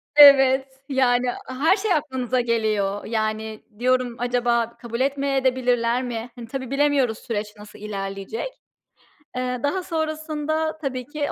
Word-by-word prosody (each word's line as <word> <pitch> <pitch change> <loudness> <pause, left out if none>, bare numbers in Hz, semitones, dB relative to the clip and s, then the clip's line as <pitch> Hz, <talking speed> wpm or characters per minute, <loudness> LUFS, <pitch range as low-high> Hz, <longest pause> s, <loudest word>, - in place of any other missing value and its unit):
Evet, 270 -2 +8 0.2
yani, 250 -2 +2 0.2
her 285 +9 +2
şey 395 -2 +1
aklınıza 260 -4 0
geliyor. 215 -4 0
Yani, 220 -1 -2 0.2
diyorum 255 -1 +1
acaba 240 -1 0
kabul 235 -1 -6
etmeye 275 -1 0
de 260 -1 +3
bilirler 245 -1 +1
mi? 240 -1 -4
Hani, 235 -2 -9
tabii 260 0 -5
bilemiyoruz 275 -5 +2
süreç 210 -2 -3
nasıl 210 0 -13
ilerleyecek. 195 - -4 0.9
Eee, 250 0 -2
daha 365 +6 0
sonrasında 315 -1 -2
tabii 265 -5 -4
ki 295 +2 -3
255 Hz, 135 wpm, -23 LUFS, 230-285 Hz, 0.9 s, Evet